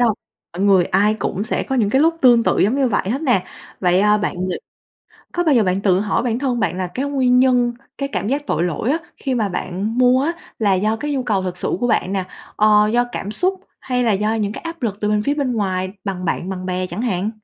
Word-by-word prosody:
đâu, 235 -3 +3 0.4
mọi 175 - -6
người 190 -3 +5
ai 205 +4 +2
cũng 205 -2 -3
sẽ - - -1
có 265 - -3
những 215 -5 +2
cái 265 - +3
lúc 330 +2 +3
tương 240 -3 +6
tự - - +1
giống 210 +6 +3
như 270 -2 +2
vậy 200 -3 -1
hết 265 +5 -1
nè. 245 - +2 0.4
Vậy, 180 0 +3
ơ, 210 +1 +4
bạn 210 - -2
ngh - - -2 0.8
có 350 - 0
bao 310 -4 +4
giờ 235 - +4
bạn 185 -1 0
tự 190 -2 +2
hỏi 210 -1 0
bản 235 -1 -1
thân 255 -3 -1
bạn 185 - -1
là 185 - -1
cái 250 +10 -4
nguyên 260 -3 +2
nhân 250 -2 +3 0.3
cái 275 - -2
cảm 205 - -2
giác 285 +3 -1
tội 160 - 0
lỗi 180 - -1
á, 310 - +2 0.2
khi 265 -2 -2
mà 220 -4 0
bạn 195 +5 -3
mua 255 +1 +4
á, 320 +4 0 0.3
là 205 -3 +2
do 215 +4 +1
cái 295 +5 -3
nhu 270 -2 -1
cầu 205 -6 0
thực 180 -1 -4
sự - - -2
của 245 - +1
bạn 220 -5 +1
nè, 190 -2 -1 0.3
ờ, 210 0 +5
do 240 +1 +3
cảm 200 - -4
xúc 370 - -1 0.2
hay 250 -1 -1
là 225 - +3
do 210 +3 0
những 210 -2 -1
cái - - -8
áp 335 -2 -7
lực 205 -4 -2
từ 210 - 0
bên 210 0 +1
phía 285 +6 0
bên 280 -4 -1
ngoài 190 -4 -1
bằng 190 -3 -4
bạn 175 +1 -2
bằng 185 -1 -5
bè 185 0 -2
chẳng 180 +5 -5
hạn? 210 -4 -1
215 Hz, 265 wpm, -20 LUFS, 190-255 Hz, 0.8 s, tương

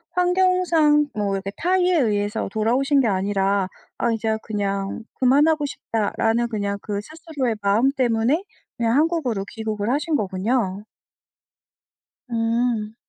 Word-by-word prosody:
환경상 355 -5 +3
뭐 205 -2 -1
이렇게 195 0 -4
타의에 365 +1 +2
의해서 210 -3 0
돌아오신 255 +7 +2
게 245 - +1
아니라 195 -1 +1 0.3
'아 235 - +1
이제 220 0 0
그냥 200 0 -3 0.2
그만하고 290 +4 +4
싶다.'라는 225 -1 -1
그냥 200 -2 -2
그 205 -2 -3
스스로의 305 -6 -3
마음 215 +7 +3
때문에 255 - +1 0.3
그냥 230 +1 +1
한국으로 295 - 0
귀국을 220 0 -3
하신 300 +3 0
거군요. 200 0 -1 1.5
음. 230 -1 0
230 Hz, 280 characters per minute, -22 LUFS, 205-290 Hz, 1.5 s, 그만하고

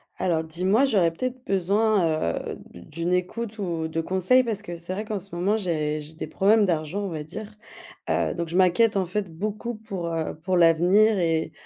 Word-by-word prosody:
Alors, 165 -3 0
dis-moi, 185 - +2
j'aurais 195 -10 +3
peut-être 255 +8 -5
besoin, 190 - +1 0.2
heu, - - -5 0.2
d'u - - -11
d'une 170 - -3
écoute 215 +5 -2
ou 170 -5 -2
de 160 +1 -2
conseils, 190 +9 +3
parce 215 -4 -3
que 175 -5 -6
c'est 170 +2 -5
vrai 210 +3 -4
qu'en 215 -2 -3
ce 190 -1 -10
moment, 195 +5 +1
j'ai 155 -6 -1
j'ai 150 +2 -12
des - - -5
problèmes 205 +7 +3
d'argent, 170 +2 -1
on 200 - -3
va 155 -3 -5
dire, 210 +7 -8 0.6
heu, - - +1
donc 170 -1 -3
je 170 - -1
m'inquiète, 190 +4 +4
en 190 - +1
fait, 185 0 -3
beaucoup 215 +5 -3
pour, 195 -5 -6
heu, 165 -1 -2
pour 180 +4 -1
l'avenir 180 +6 +5
et 165 -2 0
185 Hz, 200 wpm, -25 LUFS, 165-210 Hz, 0.6 s, l'avenir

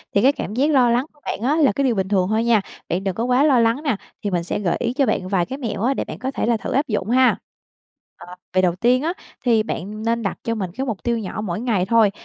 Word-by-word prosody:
thì 200 - +4
cái 265 - +6
cảm 210 - -5
giác 275 +7 +2
lo 255 -4 +4
lắng 240 +3 +2
của 295 - -27
bạn - - -3
á 270 +6 +2
là 305 -7 +4
cái 275 - -1
điều 250 -4 +2
bình 190 -1 -1
thường 190 -2 +1
thôi 220 +1 +1
nha, 230 -3 +3 0.3
bạn 180 +3 -1
đừng 195 -2 -2
có 225 - -2
quá 250 +3 +3
lo 280 -5 +4
lắng 230 +5 +2
nè, 280 -7 +1 0.3
thì 205 - 0
mình 175 -2 0
sẽ 170 - -2
gợi 175 -4 0
ý 235 - -1
cho 275 +1 +2
bạn 185 - -1
vài 185 -2 +1
cái 265 - -6
mẹo 230 -8 -4
á, 260 +3 +2
để - - -3
bạn - - -8
có 260 +1 -3
thể - - -2
là 235 0 +2
thử 215 - -5
áp 280 +3 +1
dụng 210 -2 -2
ha! 255 +1 +4 0.9
Ờ, 180 - -10 0.2
về 185 - +4
đầu 175 -2 +2
tiên 245 +6 +2
á, 335 +3 0 0.3
thì 230 -3 +4
bạn 215 0 -5
nên 230 0 0
đặt 195 - -2
cho 230 - -1
mình 190 -5 -3
cái 265 - -1
mục 220 -6 -4
tiêu 235 -1 0
nhỏ 215 0 -5
mỗi 180 -4 -3
ngày 220 -7 +1
thôi, 220 -1 +4
230 Hz, 300 wpm, -21 LUFS, 195-255 Hz, 0.9 s, cái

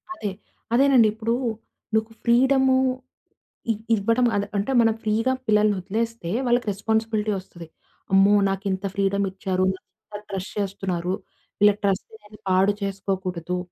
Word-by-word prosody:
అదే 210 - -3 0.4
అదేనండి. 260 -3 +5
ఇప్పుడు 225 +1 -1 0.6
నీకు 220 +1 0
ఫ్రీడము 265 +2 +4 1.0
ఇ - - +2 0.2
ఇవ్వడం. 230 +4 +2
అదే 205 0 0
అంటే 200 +6 -1
మనం 225 -1 +3
ఫ్రీ‌గా 225 +4 +1
పిల్లల్ని 210 -1 +3
వదిలేస్తే, 220 0 -3 0.2
వాళ్ళకి 240 -2 +2
రెస్పాన్సిబిలిటీ 220 +1 -1
వస్తది. 170 -3 -12 0.5
అమ్మో! 195 +1 +6 0.2
నాకు 195 +1 -3
ఇంత 190 +1 -3
ఫ్రీడమ్ 200 0 +1
ఇచ్చారు. 190 -1 -1 0.5
ఇంత 205 - -6
ట్రస్ట్ 190 -1 -5
చేస్తున్నారు. 185 -3 -2 0.5
వీళ్ళ 205 0 +7
ట్రస్ట్ 195 -1 0 0.2
నేను 210 0 -15
పాడు 190 +2 +4
చేసుకోకూడదు. 190 -3 -3
205 Hz, 125 wpm, -24 LUFS, 195-225 Hz, 1.0 s, వీళ్ళ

